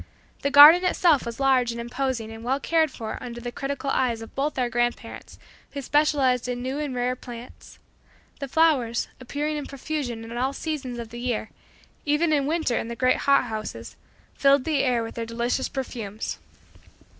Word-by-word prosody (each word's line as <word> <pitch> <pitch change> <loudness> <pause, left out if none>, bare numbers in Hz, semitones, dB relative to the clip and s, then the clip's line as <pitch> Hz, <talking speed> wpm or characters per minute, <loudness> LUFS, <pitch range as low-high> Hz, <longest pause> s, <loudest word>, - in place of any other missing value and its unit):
The 280 - 0
garden 295 +5 +9
itself 340 -7 +3
was 235 +1 -6
large 260 -3 +3
and 235 - -6
imposing 240 -1 -3
and 225 0 -9
well 265 +3 0
cared 320 +1 +2
for 225 -4 -6
under 240 -1 -7
the 240 0 -5
critical 275 +1 -3
eyes 235 -3 0
of 225 - -12
both 285 +3 -1
of - - +1
our - - 0
grandparents, 240 +1 -3 0.4
who 280 - -4
specialized 270 -4 +2
in 245 0 -3
new 265 +3 -3
and 290 -4 -3
rare 250 +1 0
plants. 245 -1 -11 0.6
The 275 - -4
flowers, 270 -6 +2
appearing 295 +4 -3
in 290 - -5
profusion 275 -5 -4
in 230 +1 -8
all 260 +3 0
seasons 280 -6 -4
of 235 -2 -6
the 240 +1 -8
year 240 -3 -2 0.5
(even 310 +2 +2
in 280 -2 +1
winter 315 -6 0
in - - -4
the 235 - -5
great 255 +1 +2
hot 280 0 +3
houses), 220 -3 -6 0.4
filled 275 -1 +4
the 305 -1 0
air 245 -3 +1
with 225 - -6
their 230 - -4
delicious 235 +3 -1
perfumes. 230 -6 -5
255 Hz, 185 wpm, -25 LUFS, 235-285 Hz, 0.6 s, garden